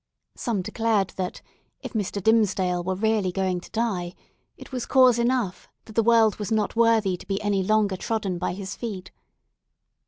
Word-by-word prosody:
Some 215 -6 -2
declared, 220 -2 0
that 185 -1 -4 0.4
if - - -7
Mr. 205 -2 -2
Dimmesdale 190 -5 +2
were 190 +1 -1
really 210 -2 +1
going 185 -1 -1
to - - -14
die, 200 -6 -2 0.4
it - - -12
was 250 -2 -4
cause 255 -3 +5
enough 235 -6 0 0.2
that 220 - -12
the 230 - +3
world 225 -1 +4
was 210 -1 -5
not 215 -1 0
worthy 225 -5 +3
to 180 - -13
be 195 0 -1
any 205 -2 +1
longer 205 -1 +1
trodden 200 -4 -2
by 180 - -2
his 190 0 -6
feet. 200 -6 -6
205 Hz, 175 wpm, -25 LUFS, 185-225 Hz, 0.4 s, cause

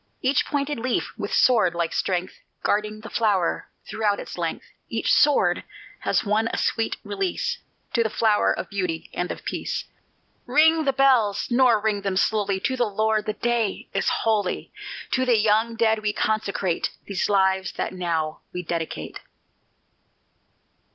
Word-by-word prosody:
Each 260 +1 +2
pointed 285 -2 -1
leaf 250 +1 -1
with - - -5
sword 220 -9 +4
like 170 -1 -1
strength, 185 0 -2 0.2
Guarding 210 +1 0
the 225 - -9
flower 205 -6 +1 0.2
throughout 210 -2 0
its - - -7
length; - - -3 0.2
Each - - +1
sword 295 -1 +4 0.4
has - - 0
won 215 +2 +2
a - - -3
sweet 225 -1 0
release 205 - -2 0.3
To 235 - +3
the 225 - +1
flower 215 -1 +2
of - - -3
beauty 180 -5 -3
and 180 - -2
of - - -8
peace. - - -3 0.6
Ring 315 +4 +4
the 275 - +3
bells, 255 -7 +3
nor 240 -2 +5
ring 210 -1 0
them 195 -1 -1
slowly, 200 -1 +1
To 260 - 0
the 245 -2 +1
Lord 215 +1 0
the 215 - 0
day 235 -3 -1
is - - +1
holy; 210 -4 -1 0.4
To 260 - +2
the 245 -3 +3
young 220 +2 +2
dead 220 -1 +2
we 210 -1 -1
consecrate 200 -5 0 0.2
These 195 -3 -1
lives 190 -2 +2
that - - -3
now 165 -4 -2
we 180 - -5
dedicate. 165 -1 -4
215 Hz, 155 wpm, -24 LUFS, 195-235 Hz, 0.6 s, nor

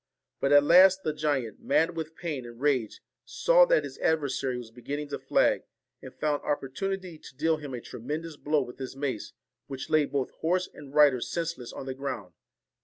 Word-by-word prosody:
But 140 - +1
at 145 0 +7
last 185 +4 +6
the 155 - -1
giant, 140 -8 -1
mad 165 +1 +1
with 160 0 -5
pain 155 -7 -4
and 120 0 -11
rage, 130 -6 0 0.2
saw - - +4
that - - +3
his - - -8
adversary 140 -5 0
was 120 -2 -8
beginning 145 +5 -5
to 145 - -4
flag, - - +2 0.4
and - - -9
found 150 -1 -1
opportunity 175 +5 -3
to 130 - -13
deal 160 +2 +2
him 145 -4 -6
a 120 - -6
tremendous 150 +9 -6
blow 145 0 +1
with 125 +1 -11
his 130 0 -6
mace, 135 -6 -4 0.3
which 135 +2 -7
laid 155 -2 +3
both 140 -2 -1
horse 180 +3 0
and 145 -1 -12
rider 145 -5 +6
senseless 165 -7 -3
on - - -7
the 135 - -3
ground. 125 -9 -5
145 Hz, 185 wpm, -28 LUFS, 130-160 Hz, 0.4 s, at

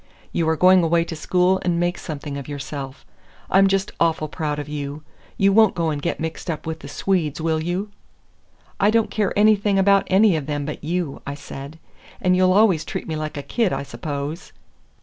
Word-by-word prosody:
You 165 -1 0
are 160 - +2
going 185 +3 +6
away 165 +1 +3
to 165 - -6
school 180 +3 +1
and 170 -2 +1
make 175 +1 0
something 145 -2 -6
of 140 -1 -6
yourself. 140 -1 -7 0.5
I'm 195 +1 +6
just 195 0 0
awful 160 -2 +1
proud 150 -1 -3
of 145 -1 -5
you. 145 0 -5 0.3
You 195 0 +4
won't 220 -1 +5
go 165 -2 0
and 145 -1 -3
get 170 - -2
mixed 160 +2 -5
up 160 - -4
with 160 0 -4
the - - -10
Swedes, 165 -6 -1
will 160 0 0
you?" 180 +5 -3 0.9
"I 200 - +4
don't 225 0 +2
care 210 -3 0
anything 205 -1 +4
about 195 0 +4
any 195 0 +4
of 150 -3 -3
them 145 -1 -2
but 150 - -6
you," 170 -2 -2
I 140 - -3
said. 145 +1 -9 0.4
"And 180 -1 +2
you'll 185 0 +4
always 195 -6 +4
treat - - -5
me 160 - -3
like 155 0 -4
a 140 - -4
kid, 225 - 0
I 135 +1 -2
suppose." 140 +5 -6
165 Hz, 205 wpm, -22 LUFS, 150-190 Hz, 0.9 s, going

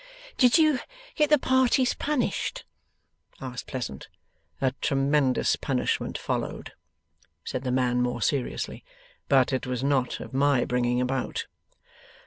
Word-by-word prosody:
'Did 250 +2 +5
you 310 -5 +4 0.3
get 300 -2 +2
the 300 - +6
parties 260 -1 +3
punished?' 300 - -2 0.7
asked 125 -1 -6
Pleasant. 120 - -5 0.5
'A 130 - +2
tremendous 140 -2 +2
punishment - - -1
followed,' - - -4 0.7
said 130 - -4
the 130 -1 -2
man, 125 -1 +1
more 125 -1 -1
seriously; 130 +3 -2 0.5
'but 135 -1 +4
it 130 0 -1
was 125 0 -2
not 135 -3 +1
of - - -9
my 140 -1 +3
bringing 125 0 +1
about. 130 +1 -2
135 Hz, 120 wpm, -26 LUFS, -, 0.7 s, the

